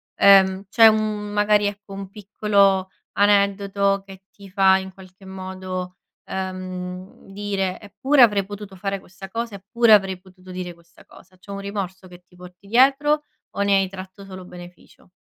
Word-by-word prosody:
Ehm, 195 0 +5
c'è 225 +1 +7
un 220 - +5
mhmm, 210 -1 -4
magari, 210 0 +3
ecco, 205 0 -7
un 195 -1 -7
piccolo 200 -2 +1 0.3
aneddoto 200 -1 +2
che 195 -1 -13
ti 200 -1 -15
fa 190 0 +4
in 190 0 -7
qualche 190 0 -16
modo, 185 -1 -7 0.3
ehm, 185 -1 -6
dire: 195 -2 -3
"Eppure 260 +7 +1
avrei 205 -4 +3
potuto 205 -1 -9
fare 195 +1 -3
questa 190 +1 -12
cosa, 230 +1 -4
eppure 220 +4 +3
avrei 195 -3 +3
potuto 185 0 -16
dire 180 -1 -6
questa 170 0 -22
cosa." 185 0 -19
C'è 200 +2 -13
un 200 - -5
rimorso 195 -2 -6
che 180 0 -15
ti 180 - -24
porti 180 +2 -15
dietro 275 +6 +3 0.3
o - - -4
ne 200 0 +3
hai 195 -1 +2
tratto 190 +1 -10
solo 185 -1 -10
beneficio? 180 0 -15
195 Hz, 165 wpm, -22 LUFS, 185-205 Hz, 0.3 s, c'è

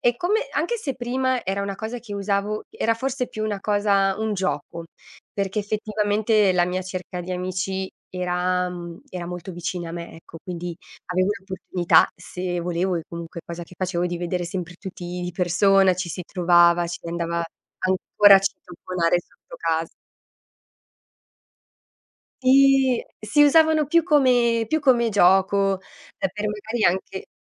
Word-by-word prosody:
e 240 0 +2
come 400 - +1
anche 475 - 0
se 290 - -4
prima 255 +1 -1
era 195 +2 -1
una 200 0 -3
cosa 225 +4 -5
che 220 -4 -8
usavo 200 +1 -1
era 230 - 0
forse 255 +2 -2
più 215 - -4
una 205 -2 -2
cosa 200 -1 +2
un 220 0 -1
gioco, 170 -2 -3 0.5
perché 195 +1 -2
effettivamente 210 0 +1
la 175 -1 +3
mia 185 +1 -2
cerca 185 -1 -6
di 175 +1 -7
amici 185 +1 -3 0.2
era 180 0 0
mhmm, 170 -1 -8
era 180 -2 -5
molto 180 +1 -6
vicina 175 0 -4
a - - -8
me, 170 0 -7
ecco, 165 0 -13
quindi 175 -1 -5 0.4
avevo 185 +2 +2
l'opportunità 185 -3 +2
se 180 0 -4
volevo, 175 +1 -1
e 165 - -3
comunque 170 0 -7
cosa 170 0 -7
che 180 - -16
facevo, 180 -1 -1
di 175 - -3
vedere 175 +1 -2
sempre 175 0 -5
tutti 185 -2 -8 0.2
di 175 - -3
persona, 190 +1 +4
ci 180 0 -4
si 180 - -5
trovava, 175 -1 +4
si 170 0 -6
andava 170 0 -2 0.4
ancora 195 +2 +5
a - - +5
citofonare 180 -2 -1
sotto - - -16
casa. 165 -1 -1 2.5
Sì, 265 -1 +5 0.2
si 215 +8 +3
usavano 315 0 +4
più 335 +4 +4
come 250 -7 +3
più 315 +6 +1
come 245 -4 +3
gioco, 195 0 +3 0.4
e 195 - 0
per 210 - -5
magari 215 +2 -2
anche 190 +1 -1
190 Hz, 155 wpm, -23 LUFS, 175-215 Hz, 2.5 s, ancora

